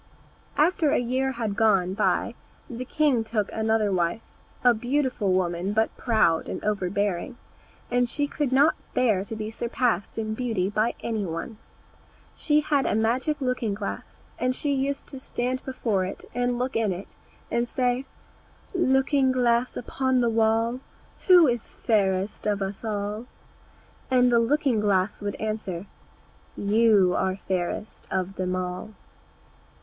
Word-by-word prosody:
After 315 0 +3
a - - +3
year 260 +2 0
had 225 -5 -2
gone 195 -4 +3
by 210 - +1 0.3
the 245 +1 -6
king 280 -5 +2
took 220 -2 -2
another 220 -1 +1
wife, 175 +4 0 0.4
a 245 -1 +6
beautiful 245 -3 0
woman, 185 +1 0
but 220 +1 +1
proud 215 -9 +2
and - - -5
overbearing, 200 +1 -1 0.5
and 245 0 +2
she 290 - 0
could 285 -2 -2
not 280 +4 +5 0.2
bear 220 -7 +2
to 225 - -7
be 215 0 -4
surpassed 230 -4 -1
in 215 -1 -2
beauty 220 -5 -1
by 215 +3 +1
any 220 -3 -2
one. 180 +6 -5 0.8
She 300 -1 +2
had 290 -2 +1
a - - +1
magic 245 +7 +1
looking 250 -6 -1
glass, 200 -1 -6 0.2
and 255 0 +1
she 285 +1 0
used 275 +1 -1
to 270 - -8
stand 255 0 -3
before 225 -7 -1
it, 185 - -6
and 245 0 0
look 255 +2 -2
in 220 -3 +1
it, 185 +2 -7 0.4
and 235 0 0
say, 250 0 0 0.7
"Looking 270 -4 +3
glass 245 -1 +1
upon 260 +1 0
the 235 -1 +2
wall, 225 +2 +2 0.5
Who 360 -3 +8
is 240 -2 -2
fairest 200 -3 0
of 205 -1 0
us 195 +3 -5
all?" 210 +1 -3 0.8
And 250 -1 +4
the 235 - +5
looking 260 0 +2
glass 200 -1 +1
would 205 0 -3
answer, 215 -4 -4 0.7
"You 205 -3 +4
are 190 -1 0
fairest 185 +3 -3
of 190 0 -2
them 185 0 -1
all." 185 +3 -4
225 Hz, 145 wpm, -26 LUFS, 200-255 Hz, 0.8 s, Who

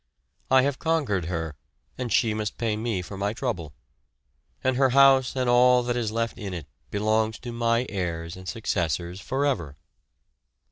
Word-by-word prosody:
I 130 0 +6
have 140 -1 -1
conquered 145 - 0
her 85 -3 -3 0.4
and 125 -2 -4
she 115 -3 +3
must 105 -1 -3
pay 115 -3 0
me 110 -4 -2
for 95 +3 -8
my 100 +1 0
trouble; 90 - -4 0.9
and 130 0 +2
her 135 +1 +4
house 135 -1 +5
and 130 -1 0
all 125 0 +5
that 120 0 -1
is 115 -3 -1
left 115 +2 -2
in 100 -4 -5
it 80 -5 -6 0.2
belongs 110 +1 +1
to 120 - -7
my 115 +1 +1
heirs 85 -3 -3
and 95 0 -8
successors 90 - -2
forever. 130 - -1
110 Hz, 160 wpm, -26 LUFS, 95-125 Hz, 0.9 s, I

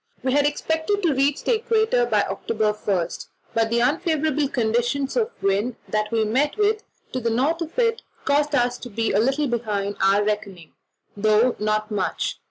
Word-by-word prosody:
We 260 - +1
had 290 0 +4
expected 320 +7 -1
to 330 -4 +3
reach 275 +2 +1
the - - +2
Equator 455 +2 +1
by - - +2
October 215 -1 -1
1, 195 -5 -1 0.4
but 225 0 +1
the 235 +1 +1
unfavourable 310 +1 +1
conditions 240 +3 0
of 465 -2 +1
wind 200 +5 +1
that 215 0 -1
we 225 -1 +2
met 270 - 0
with 425 +1 +2 0.3
to 255 - -2
the 235 -1 -1
north 280 +9 +1
of 330 +5 -5
it 460 -2 +2 0.2
caused 290 +1 +2
us 245 -1 +1
to 245 - -8
be 225 +1 -1
a 200 - +2
little 270 +6 +1
behind 210 -4 -2
our 195 +2 +4
reckoning, 200 -5 -4 0.4
though 215 +4 +3
not 215 +1 -1
much. 200 -3 -2
245 Hz, 180 wpm, -23 LUFS, 215-300 Hz, 0.4 s, had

